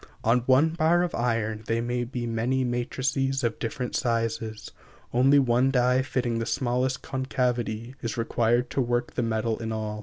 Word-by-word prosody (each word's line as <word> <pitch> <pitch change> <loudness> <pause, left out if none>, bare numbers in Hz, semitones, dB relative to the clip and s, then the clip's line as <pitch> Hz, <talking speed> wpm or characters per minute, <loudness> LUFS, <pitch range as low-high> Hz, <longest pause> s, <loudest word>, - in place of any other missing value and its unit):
On 115 +3 +4
one 135 +5 +5
bar 165 +2 +2
of 175 - -2
iron 115 -2 -1
there 115 0 +1
may 120 +1 -1
be 120 0 -4
many 120 +3 0
matrices 130 +2 -1
of 115 -2 -1
different 125 +1 -3
sizes, 115 -2 -2 0.4
only 135 +4 +5
one 130 -1 +3
die 125 0 +3
fitting 125 -3 -1
the 115 - -3
smallest 130 +1 0
concavity, 125 -3 -2
is 115 -1 -3
required 120 +1 +1
to 135 - 0
work 120 0 -1
the - - -1
metal 110 -1 -1
in 110 -1 -4
all. 110 -1 -3
120 Hz, 170 wpm, -26 LUFS, 115-130 Hz, 0.4 s, one